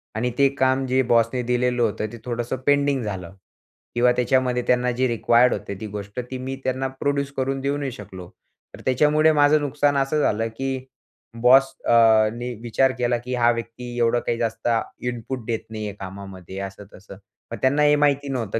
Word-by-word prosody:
आणि 120 +2 -1
ते 140 0 +5
काम 130 0 +2
जे 130 +1 +2
बॉसने 120 +1 +2
दिलेलं 125 0 0
होतं 110 -1 0
ते 120 - -9
थोडंसं 120 +1 -3
पेंडिंग 140 -3 +2
झालं 95 -4 -5 0.6
किंवा 125 +1 +4
त्याच्यामध्ये 125 0 +1
त्यांना 125 0 +2
जे 130 +2 0
रिक्वायर्ड 120 +1 +3
होते - - -5
ती 110 - -4
गोष्ट 100 +2 -7
ती 130 - -3
मी 130 +1 -5
त्यांना 130 +1 -1
प्रोड्यूस 140 -1 0
करून 135 +1 -1
देऊ 140 +1 -1
नाही 140 -2 -3
शकलो. 95 -6 -10 0.5
तर - - -14
त्याच्यामुळे 150 +4 +3
माझं 150 0 +4
नुकसान 145 0 +1
असं 140 +2 +1
झालं 115 -3 +1
की 135 -1 -3 0.6
बॉस 135 +2 +5
अ, 110 -2 +5
नी, 120 +1 -5
विचार 125 +3 +2
केला 120 -1 +1
की 125 +2 -6
हा 120 0 +4
व्यक्ती 120 +1 -6
एवढं 120 +1 +3
काही 120 - 0
जास्त 115 0 -3 0.4
इनपुट 120 0 -5
देत 115 -1 -1
नाहीये 110 -2 -5
कामामध्ये 95 -1 -9
असं-तसं. 100 0 -9 0.4
मग - - -4
त्यांना 140 +3 +2
हे 150 0 +5
माहिती 145 -1 +1
नव्हतं 115 -4 -2
125 Hz, 180 wpm, -23 LUFS, 115-135 Hz, 0.6 s, ते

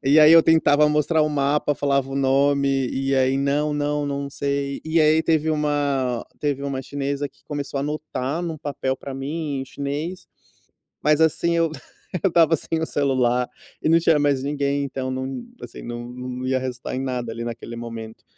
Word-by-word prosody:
E 140 +3 +5
aí 155 +1 +8
eu 165 -1 +9
tentava 150 -2 +4
mostrar 150 +2 +2
o 155 - +3
mapa, 145 0 +1
falava 140 -1 0
o 135 - -3
nome, 135 0 +2
e 135 +1 -1
aí: 130 0 +3
"Não, 145 +2 +1
não, 145 0 -1
não 140 0 -3
sei." 140 0 -2
E 160 +1 +1
aí 155 0 +4
teve 160 -1 +2
uma 145 -5 0 0.2
teve 145 -2 -1
uma 140 -2 -2
chinesa 140 +1 -3
que - - -31
começou 145 -1 -4
a - - 0
anotar 150 +1 -3
em 175 - -2
um 160 - -5
papel 140 -3 -3
para 140 - -8
mim 140 +1 -3
em - - -4
chinês, 145 +7 -4 0.8
mas 150 +1 +3
assim 170 +1 +3
eu 165 -1 +2 0.5
eu - - +6
estava 165 -2 +4
sem 160 +2 -2
o 160 - -1
celular 125 -4 +1 0.3
e - - +1
não 165 +1 +5
tinha 165 -2 +4
mais 145 -2 +2
ninguém, 140 0 -1
então, 130 -1 -4
não, 130 - -4 0.2
assim - - -9
não 120 0 -6
não 125 0 -5
ia 130 0 +1
resultar 125 -1 -5
em - - -2
nada 125 -3 -3
ali 115 +1 -5
naquele 115 0 -6
momento. 115 -1 -8
140 Hz, 195 wpm, -23 LUFS, 130-150 Hz, 0.8 s, eu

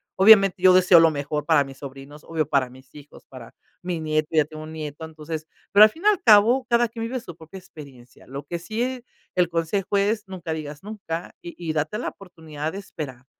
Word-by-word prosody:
Obviamente, 195 -2 +6
yo 185 -1 +7
deseo 180 -1 +6
lo 165 -1 +5
mejor 145 0 -4
para 145 - +4
mis 135 -1 -12
sobrinos, 140 +2 -11
obvio 160 -3 -2
para 135 -4 +1
mis 130 0 -18
hijos, 145 -1 -15
para 125 -3 -12 0.3
mi 175 -2 -3
nieto, 155 0 -1
ya 155 -2 +3
tengo 155 +1 -10
un 155 0 -10
nieto, 155 0 -7
entonces, 155 0 -7 0.3
pero 205 +1 +8
al 215 - +7
fin 325 - -15
y - - +4
al 420 -3 +3
cabo 230 +4 +5
cada 235 -1 +2
quien 230 0 -6
vive 255 +3 -4
su 175 -8 -11
propia 165 +4 -12
experiencia. 135 -9 -15
Lo 140 +2 -7
que 170 - -4
sí 215 +7 -5
eh, 255 -1 -4 0.3
el 180 -1 +3
consejo 175 +4 -1
es 210 +1 0
nunca 175 -4 -6
digas 150 -1 -7
nunca 195 -5 -7
y 170 - -9
y 165 -3 -4
date 155 +7 -2
la - - -3
oportunidad 160 -5 -8
de 195 - -6
esperar. 135 -9 -9
165 Hz, 220 wpm, -23 LUFS, 150-200 Hz, 0.3 s, pero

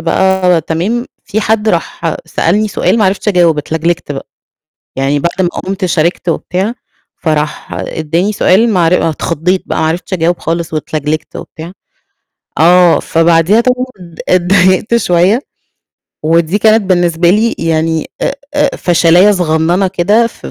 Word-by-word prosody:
بقى 190 -2 +2
تمام، 190 - -2 0.2
في 215 - -2
حد 220 0 0
راح 170 -2 -2
سألني 205 +6 0
سؤال 225 - 0
ما 210 - +3
عرفتش 195 +2 0
أجاوب 175 -5 +3
اتلجلجت 160 +1 -2
بقى، 135 - -7 0.7
يعني 135 +2 0
بعد 170 +5 -1
ما 175 - +2
قمت 190 +2 -4
شاركت 170 +1 0
وبتاع، 190 +6 -2 0.4
فراح 155 -2 -3
إدّاني 165 +6 -2
سؤال 210 +3 +2
معر 175 -3 +2
اتخضّيت 170 +4 -1
بقى - - -3
ما - - +1
عرفتش 170 +4 -3
أجاوب 175 -1 0
خالص 165 0 -3
واتلجلجت 155 0 -3
وبتاع، 165 +2 -9 0.9
آه، 175 +1 +5
فبعديها 165 +6 +2
طبعًا 250 +1 0 0.4
اتضايقت 185 +4 +2
شوية، 185 +1 +2 0.8
ودي 165 +4 +1
كانت 220 +1 +3
بالنسبة 175 -3 +1
لي 220 +4 +1
يعني 160 -1 -1
آآ - - -1 0.2
آآ 290 -1 +1
فشلاية 175 +3 +4
صغننة 175 0 +1
كده 200 +5 +2
في 230 - -10
175 Hz, 135 wpm, -12 LUFS, 165-195 Hz, 0.9 s, آه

